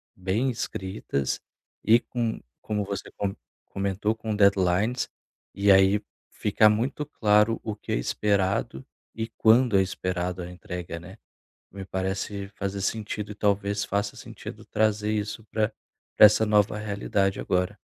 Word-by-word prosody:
bem 100 +8 0
escritas 95 - -3 0.4
e 115 +3 +6
com 115 -2 -3 0.2
como 105 -1 -2
você 100 -1 -5
come 100 -1 -2 0.3
comentou, 100 +2 -1
com 110 -1 -3
deadlines, 100 +4 +2 0.5
e 100 0 +4
aí 95 +2 +5 0.3
fica 105 +1 +3
muito 120 +7 0
claro 105 -5 +3
o 110 - -3
que 105 - -8
é - - +2
esperado 95 0 0 0.3
e 110 0 -3
quando 115 0 +5
é - - +5
esperado 90 -1 -2
a 85 - -7
entrega, 90 -1 -6
né. 95 +5 -12 0.5
Me 95 0 -7
parece 95 +1 -3
fazer 100 -1 -4
sentido 105 +1 -3
e 105 - -8
talvez 100 0 0
faça 100 +1 -1
sentido - - -9
trazer 105 0 +1
isso 105 +1 -3
pra 110 0 0 0.5
pra - - +11
essa 105 +1 +5
nova 105 -1 +3
realidade 100 -2 -1
agora. 90 0 0
100 Hz, 140 wpm, -26 LUFS, 95-110 Hz, 0.5 s, pra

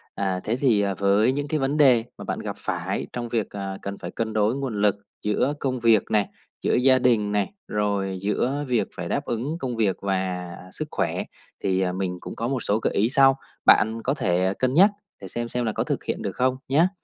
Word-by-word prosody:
À, 95 -2 -1
thế 110 - 0
thì, 125 -6 +3
à, 100 -1 0
với 100 +5 +3
những 145 +2 -2
cái 155 +1 0
vấn 135 +2 0
đề 130 -6 +6
mà - - -8
bạn - - -3
gặp - - -5
phải - - -3
trong 120 -1 -4
việc, 115 -4 -1
à, 95 -1 -5
cần 100 0 -5
phải 85 - -7
cân 110 +1 -3
đối 110 +2 +2
nguồn 130 -7 -3
lực 105 -1 +4 0.3
giữa 105 +7 +1
công 130 -2 -1
việc 115 -3 +4
này, 105 -2 +3 0.4
giữa - - +2
gia 130 +1 +5
đình 115 -5 +2
này, 105 - 0
rồi 100 -2 -1
giữa 125 +8 0
việc 120 -3 +1
phải - - -5
đáp - - -1
ứng 125 +8 -2
công 125 -5 -3
việc 105 -4 +1
và 95 -2 -2 0.2
sức - - -4
khỏe, - - -1 0.4
thì, 95 -1 +1
à, 90 -1 +1
mình 90 -1 -2
cũng - - -7
có 115 - -2
một 130 -4 -1
số 105 +2 +1
gợi - - -1
ý 110 +3 +2
sau, 135 0 +5 0.3
bạn 110 +1 +5
có 135 - +1
thể 95 - +1
cân 130 0 +1
nhắc 190 +7 +7 0.3
để - - -7
xem 120 0 -3
xem 125 0 -1
là 110 - 0
có - - 0
thực - - -2
hiện - - -3
được - - -4
không, 130 0 +1
nhá. 160 +7 +4
110 Hz, 230 wpm, -24 LUFS, 100-130 Hz, 0.4 s, nhắc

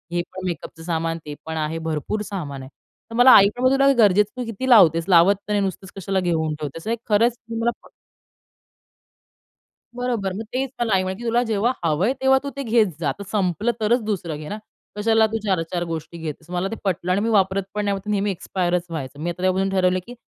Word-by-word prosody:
हे 175 - +2
पण 185 0 -6
मेकअपचं 165 -1 -6
सामान, 165 -1 -2
ते 150 - -6
पण 160 0 -4
आहे 155 +1 -2
भरपूर 160 +7 -2
सामान 150 -10 -5
आहे. 130 - -10 0.4
तर 230 - -6
मला 250 +2 +7
आई 200 - +8
तुला 270 +2 +3
गरजेचं 210 -2 +4
तू 250 - -2
किती 230 +4 -4
लावतेस? 165 -8 +6
लावत 180 +3 +6
तर 210 - -4
नाही 205 - +2
नुसतंच 190 0 -5
कशाला 195 0 -1
घेऊन 160 -4 0
ठेवतेस 150 +2 -6
नाही 230 - 0
खरंच 230 +3 +3 0.2
मला 235 +1 +1
प - - -17 2.1
बरोबर. 235 -6 -2
मग 220 +4 -5
तेच 265 +1 -1
मला 225 -4 +1
आई 185 0 +3
म्हणे 190 +5 -5
"तुला 235 +1 +2
जेव्हा 225 +1 +1
हवंय, 170 - +1
तेव्हा 265 0 +5
तू 280 - -3
ते 275 - -2
घेत 230 -2 +3
जा, 155 - 0
जर 200 - -5
संपलं 205 +3 0
तरच 230 +3 +2
दुसरं 175 -7 -3
घे 150 - -8
ना, 210 - -4 0.4
कशाला 220 +1 +3
तू 225 +1 -2
4-4 175 -2 -1
गोष्टी 165 0 -6
घेतेस." 160 0 -7
मला 180 +1 -1
ते - - -3
पटलं. 180 -2 -1
आणि 195 +3 +2
मी 230 - 0
वापरत 195 -2 +2
पण 210 0 -2
नाही 200 -1 0
नेहमी 205 0 +1
एक्स्पायरच 180 -1 -2
व्हायचं. 145 -4 -6
मी 170 +3 -2
आता 175 +1 -6
त्यापासून 185 +1 +1
ठरवलं 185 -1 +2
की 245 - -9
190 Hz, 205 wpm, -22 LUFS, 170-220 Hz, 2.1 s, आई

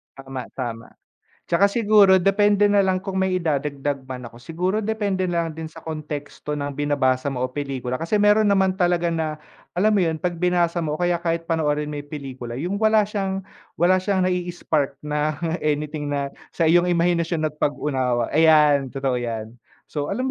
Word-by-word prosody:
Tama, 135 -1 -7
tama. 115 -3 -5 0.6
Tsaka 195 +4 +3
siguro 205 -3 +5
depende 205 +1 +4
nalang 190 -2 +2
kung 190 -1 -2
may 190 -1 +1
idadagdag 145 -4 -2
man 125 -1 -6
ako. 120 - -14
Siguro 180 - -2
depende 205 -3 -1
nalang 170 -2 -1
din 160 0 -6
sa 160 0 -13
konteksto 150 -1 -5
ng 145 -1 -3
binabasa 140 -2 0
mo 130 -2 -2
o 130 - -2
pelikula, 130 -2 -3
kasi 165 +6 -1
meron 210 +1 +4
naman 190 -1 +2
talaga 175 -1 +2
na, 160 -2 -2 0.4
alam 205 +5 +3
mo 210 - +3
yun? 165 -3 +1
'Pag 175 +1 -3
binasa 175 -1 +1
mo 155 -2 -2
o - - -9
kaya 175 -1 +1
kahit 165 -1 -1
panoorin 150 -2 -1
mo 145 - -4
yung 145 - -10
pelikula, 130 -5 -7
yung 180 - -3
wala 220 -1 +4
siyang 195 -2 -3 0.3
wala 185 +2 +3
siyang 190 -1 0
nai-spark 175 -6 -1
na 150 0 -1 0.2
anything 150 0 -2
na 140 -1 -2 0.2
sa 170 - +1
iyong 175 +2 +4
imahinasyon 170 -1 +1
at 150 - -27
pag-unawa, 130 -5 0
ayan, 150 -3 +5
totoo 135 -1 -2
yan. 115 -2 -4 0.4
So 145 -1 -2
alam 235 +6 -2
160 Hz, 175 wpm, -23 LUFS, 145-185 Hz, 0.6 s, siguro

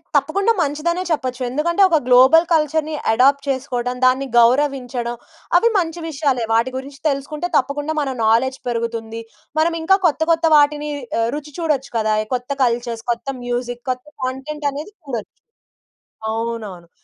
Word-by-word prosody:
తప్పకుండా 345 +10 +2
మంచిదనే 330 +4 -1
చెప్పొచ్చు. 260 -4 -2
ఎందుకంటే 335 +8 0
ఒక 330 - +4
గ్లోబల్ 260 +7 +6
కల్చర్‌ని 310 0 +1 0.2
ఎడాప్ట్ 275 +4 +3
చేసుకోవడం, 250 -2 -2
దాన్ని 260 +2 +3
గౌరవించడం 245 -1 +1 0.4
అవి 465 - +4
మంచి 340 -2 -1
విషయాలే. 275 -5 0
వాటి 230 +3 +2
గురించి 275 +1 -8
తెలుసుకుంటే 295 +4 -3
తప్పకుండా 290 +3 -1
మన 280 - -2
నౌలెడ్జ్ 240 +4 +2
పెరుగుతుంది. 230 -1 -3 0.4
మనం 330 +2 +2
ఇంకా 385 +4 +4
కొత్త 320 -2 +2
,కొత్త 330 0 +2
వాటిని 295 0 +3 0.3
ఆహ్, 230 0 +1
రుచి 300 0 -8
చూడొచ్చు 300 -5 -1
కదా! 215 -1 +1 0.2
కొత్త 250 +2 -5
కల్చర్స్ 235 -1 -1
కొత్త 235 +3 -4 0.2
మ్యూజిక్ 245 0 -3
కొత్త 255 +1 -6 0.2
కంటెంట్ 285 +3 -4
అనేది 295 +8 -7
చూడొచ్చు. 245 -8 -6 0.9
అవునవును. 220 -6 -4
270 Hz, 135 wpm, -20 LUFS, 240-300 Hz, 0.9 s, గ్లోబల్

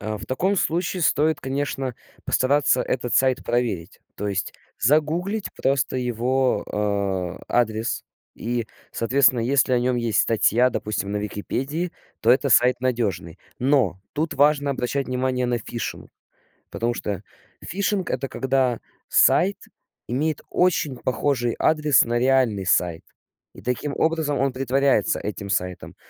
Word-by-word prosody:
Э, 110 +1 -3
в - - -9
таком 185 +10 0
случае 175 +1 0
стоит, 155 +1 +2
конечно, 135 -1 -3 0.3
постараться 140 0 +2
этот 120 -1 -2
сайт 130 -1 +2
проверить, 110 -7 -2 0.2
то 105 +1 -3
есть 100 0 -3 0.2
загуглить 160 - +1
просто 135 -1 0
его, 125 +2 0 0.7
э, - - -19
адрес 110 -2 0 0.3
и, 120 0 -3 0.3
соответственно, 125 +1 +3
если 130 +2 +2
о 125 - +3
нем 125 0 +1
есть 115 -3 +1
статья, 115 +2 +3
допустим, 105 -3 -3
на 105 - -1
"Википедии", 135 - -3 0.3
то 115 - +3
это 140 +2 +4
сайт 125 +1 +4
надежный. 105 -10 -2 0.2
Но 125 - +2
тут 155 +2 -2
важно 145 0 +3
обращать 135 +1 -2
внимание 125 0 -1
на 120 -1 0
фишинг 115 +1 -6 0.6
потому 120 +1 -1
что 100 -4 -4 0.4
фишинг- 195 0 -1
это 135 +1 -2
когда 130 -3 0 0.3
сайт 195 +4 +4 0.5
имеет 150 +5 -1
очень 165 -7 +1
похожий 120 -1 0
адрес 150 -2 +4
на 120 0 0
реальный 125 -7 +2
сайт, 85 -2 +1 0.5
и - - -13
таким 140 +3 -2
образом 160 -3 +1
он 135 0 +1
притворяется 135 -2 +1
этим 100 -1 -5
сайтом. 90 -2 -3
130 Hz, 135 wpm, -23 LUFS, 115-145 Hz, 0.7 s, это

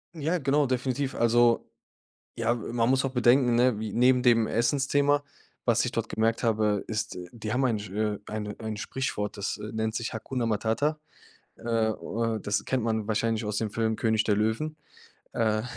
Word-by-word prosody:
Ja, 165 +3 -1
genau, 145 +1 +2
definitiv. 130 +1 -1
Also 120 0 +3 0.7
ja, - - +1
äh, - - -3
man 115 +1 -1
muss 130 +1 +3
auch 135 - -1
bedenken, 125 0 +4
ne, 120 -3 +3
wie 110 -1 -4
neben 125 +1 +4
dem 115 -3 +4
Essensthema, 140 +4 +2 0.4
was - - +3
ich - - -2
dort - - -2
gemerkt 115 +1 0
habe, 105 -3 +1
ist, 110 -3 -3
die 110 -2 -6
haben 130 +2 +2
ein, 115 -4 +1
äh 105 0 -2
eine 105 -1 -4
ein 110 -1 -4
Sprichwort, 105 -3 -3
das, 100 0 -2
äh, 105 - -6
nennt 110 0 -1
sich: 115 +1 -3
„Hakuna 120 +2 -3
Matata.“ 115 +8 0 0.6
Äh - - -19 0.3
äh, 115 +1 -2
das 105 +1 -1
kennt 130 -3 0
man 110 -2 -1
wahrscheinlich 110 +1 0
aus 105 0 -2
dem 110 -1 -1
Film 110 +1 0
König 110 -1 +1
der 105 -1 +2
Löwen. 110 +9 -1 0.6
Äh, 110 -1 +1
115 Hz, 180 wpm, -27 LUFS, 110-130 Hz, 0.7 s, bedenken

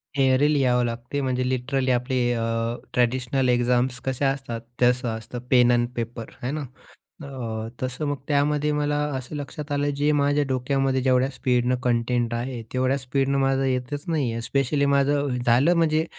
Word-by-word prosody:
Theory 135 +1 +3
लिहावी 125 -3 +2
लागते. 120 +4 -3
म्हणजे 130 -1 -1
लिटरली 130 +1 0
आपले 125 +1 0 0.2
अ, 115 0 -1 0.2
ट्रॅडिशनल 125 +1 +1
एक्झाम्स 125 +1 +1
कशा 135 +1 +1
असतात, 120 -4 -5 0.2
तसं 125 0 +3
असतं 120 +2 -7
पेन 125 -1 +5
अन 120 0 +2
पेपर 115 -1 -5
आहे 125 +2 -2
ना. 155 0 -3 0.6
अ, 115 -5 -5
तसं 130 +4 -3
मग, 145 - -1
त्यामध्ये 150 +1 +1
मला 145 0 0 0.2
असं 130 +4 -6
लक्षात 145 +1 -6
आलं 145 0 +1
जे 145 +1 +1
माझ्या 145 +1 +2
डोक्यामध्ये 130 +1 0
जेवढ्या 130 0 +3
स्पीडनं 125 -1 +1
कंटेंट 120 0 +1
आहे, 120 0 -4
तेवढ्या 130 +1 +1
स्पीडनं 135 +1 0
माझं 135 0 +2
येतच 130 +2 -2
नाही 145 -7 0
आहे. 115 - -3
स्पेशली 140 +2 +1
माझं 140 -1 +1
झालं 130 +9 +4
म्हणजे 160 -1 +2
130 Hz, 160 wpm, -24 LUFS, 125-140 Hz, 0.6 s, पेन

